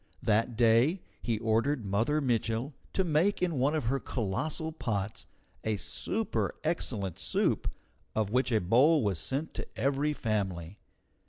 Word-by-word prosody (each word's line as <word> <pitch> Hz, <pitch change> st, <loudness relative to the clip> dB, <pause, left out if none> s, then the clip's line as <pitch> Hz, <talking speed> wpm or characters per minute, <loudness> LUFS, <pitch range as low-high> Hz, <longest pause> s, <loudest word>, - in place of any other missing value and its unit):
That 115 Hz, +1 st, +1 dB
day 120 Hz, +10 st, +4 dB, 0.2 s
he 115 Hz, -2 st, 0 dB
ordered 115 Hz, +3 st, +1 dB
Mother 115 Hz, +10 st, +1 dB
Mitchel 120 Hz, +1 st, 0 dB, 0.2 s
to 190 Hz, -, +2 dB
make 175 Hz, +4 st, +2 dB
in 170 Hz, -7 st, 0 dB
one 140 Hz, +5 st, +2 dB
of 155 Hz, -, -1 dB
her 135 Hz, +4 st, +1 dB
colossal 140 Hz, -, -2 dB
pots 110 Hz, -9 st, -3 dB, 0.4 s
a 110 Hz, -1 st, 0 dB
super 220 Hz, -, -1 dB
excellent 100 Hz, -, -1 dB
soup -, -, +1 dB, 0.5 s
of 110 Hz, -2 st, 0 dB
which 125 Hz, +2 st, +2 dB
a 110 Hz, -, +4 dB
bowl 130 Hz, -, +4 dB
was 100 Hz, -5 st, 0 dB
sent 140 Hz, +4 st, -2 dB
to -, -, -4 dB
every 140 Hz, +4 st, +1 dB
family. 100 Hz, -, -2 dB
120 Hz, 145 wpm, -30 LUFS, 110-150 Hz, 0.5 s, day